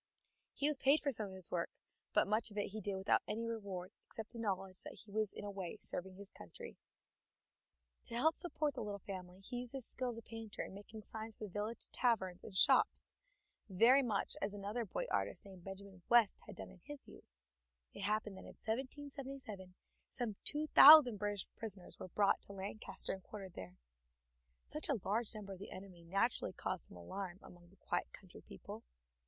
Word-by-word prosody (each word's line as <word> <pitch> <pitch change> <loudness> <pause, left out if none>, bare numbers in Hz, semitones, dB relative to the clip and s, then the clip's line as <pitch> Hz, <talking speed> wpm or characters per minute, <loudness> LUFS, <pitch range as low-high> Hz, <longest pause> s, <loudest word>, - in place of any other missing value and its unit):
He 285 - +2
was 300 -3 +4
paid 280 +3 +6
for 285 - 0
some 220 -4 -2
of 190 - -9
this 185 -2 -2
work, 170 -1 0 0.4
but - - +5
much 215 +2 +2
of 210 - -11
it 205 - 0
he 215 +2 -5
did 200 0 -1
without 190 0 +3
any 225 +2 -2
reward, 200 -5 -4 0.2
except 220 -1 -5
the 235 - -8
knowledge 195 -3 -1
that - - -6
he 210 - -14
was 215 -1 +1
in 205 - -7
a 205 - -3
way 195 0 -5
serving 185 +1 -4
his 200 0 -9
country. 475 -1 -10 1.3
To 235 - -4
help 315 +7 +4
support 305 -4 0
the - - -4
little 205 -2 -3
family 185 -1 -7
he 245 +5 -5
used 245 0 -1
his 265 -4 0
skill 255 -1 -1
as 235 - -5
a 230 - -7
painter 225 -2 -4
in - - -8
making 210 +2 -9
signs 220 +1 -5
for 215 - -6
village 210 +4 -1
taverns 190 -7 +1
and 190 - -6
shops, - - +4 0.6
very 230 +8 +7
much 220 -6 0
as 200 +1 -1
another 205 +4 -2
boy - - -2
artist - - 0
named 190 -3 -12
Benjamin 195 -1 -9
West 235 -4 +5
had - - -8
done - - -8
in 190 - -15
his 290 +9 -10
youth. - - -14 0.6
It - - -6
happened 210 0 0
that - - -10
in - - -11
1777 260 -5 -5 0.3
some 235 -5 -3
two 300 +1 -1
thousand 290 -6 +11
British 205 -1 -1
prisoners 200 -5 -7
were - - -5
brought 200 +2 +3
to 200 - -7
Lancaster 195 +2 -4
and 190 - -6
quartered 195 -2 -8
there. 90 -1 -8 0.9
Such 305 +1 -2
a 275 -6 +2
large 220 +3 0
number 200 -2 -6
of 185 - -10
the 200 - -7
enemy 185 -3 -9
naturally 195 +4 +1
caused 185 -2 -3
some - - -13
alarm 185 - -5
among 175 -1 -14
the 195 - -21
quiet - - -2
country - - -12
people. 65 - -9
205 Hz, 200 wpm, -38 LUFS, 190-235 Hz, 1.3 s, thousand